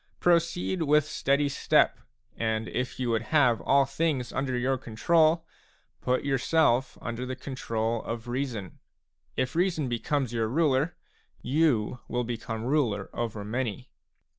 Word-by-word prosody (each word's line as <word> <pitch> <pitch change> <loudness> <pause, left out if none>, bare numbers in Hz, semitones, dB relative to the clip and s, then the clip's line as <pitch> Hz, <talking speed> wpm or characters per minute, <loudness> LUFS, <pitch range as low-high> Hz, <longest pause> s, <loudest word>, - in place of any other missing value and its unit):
Proceed 175 +1 +2
with 150 -1 +4
steady 145 -1 +1
step, 140 - +2 0.4
and 110 0 -1
if 125 +1 -3
you 125 -2 0
would 115 -1 +1
have 125 -3 +3
all 140 0 +4
things 135 -3 -1
under 130 -2 -1
your 130 +2 +1
control, 155 +7 +2 0.6
put 130 +1 0
yourself 135 -2 +2
under 115 +1 -4
the 130 0 -4
control 115 -4 -2
of 115 +1 -5
reason; 120 -6 -4 0.6
if 130 +2 -1
reason 170 -5 +1
be 120 -1 -1
comes 135 -4 -1
your 115 -1 0
ruler, 150 +3 +1 0.5
you 125 -5 +1
will 125 0 -1
become 115 -1 -4
ruler 120 -7 0
over 110 -3 -3
many. 120 +2 -3
130 Hz, 140 wpm, -28 LUFS, 115-145 Hz, 0.6 s, with